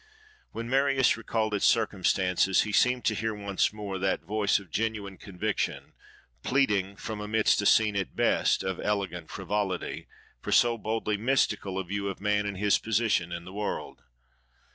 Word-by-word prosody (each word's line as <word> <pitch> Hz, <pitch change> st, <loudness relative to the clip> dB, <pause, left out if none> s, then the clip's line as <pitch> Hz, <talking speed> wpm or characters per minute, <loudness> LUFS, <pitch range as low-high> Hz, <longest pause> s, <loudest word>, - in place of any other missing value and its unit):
When 115 Hz, 0 st, -5 dB
Marius 135 Hz, 0 st, +3 dB
recalled 110 Hz, -1 st, -2 dB
its 100 Hz, -, +2 dB
circumstances 95 Hz, 0 st, +2 dB
he 110 Hz, -, -4 dB
seemed 125 Hz, +3 st, +2 dB
to 110 Hz, -, +3 dB
hear 110 Hz, +1 st, -2 dB
once 100 Hz, -2 st, 0 dB
more 105 Hz, -3 st, -5 dB
that 95 Hz, +1 st, 0 dB
voice 105 Hz, -1 st, +1 dB
of 95 Hz, -5 st, -10 dB
genuine 105 Hz, -2 st, -3 dB
conviction, 90 Hz, -3 st, -3 dB, 0.5 s
pleading, 105 Hz, -, +1 dB
from 110 Hz, +1 st, -6 dB
amidst 105 Hz, 0 st, +2 dB
a 105 Hz, -, +2 dB
scene 110 Hz, -2 st, +4 dB
at 95 Hz, -2 st, -3 dB
best -, -, +2 dB
of 95 Hz, -2 st, -3 dB
elegant 100 Hz, -4 st, -2 dB
frivolity, 100 Hz, -3 st, -3 dB, 0.3 s
for -, -, -5 dB
so 120 Hz, -1 st, +4 dB
boldly 110 Hz, -1 st, -1 dB
mystical 110 Hz, -5 st, 0 dB
a 95 Hz, -, -1 dB
view 100 Hz, +2 st, -3 dB
of 100 Hz, -, -5 dB
man 105 Hz, 0 st, 0 dB
and 100 Hz, -2 st, -4 dB
his 105 Hz, +1 st, +2 dB
position 110 Hz, -6 st, 0 dB
in 85 Hz, 0 st, -6 dB
the 95 Hz, -, -10 dB
world. 105 Hz, +1 st, -4 dB
105 Hz, 165 wpm, -28 LUFS, 95-110 Hz, 0.5 s, scene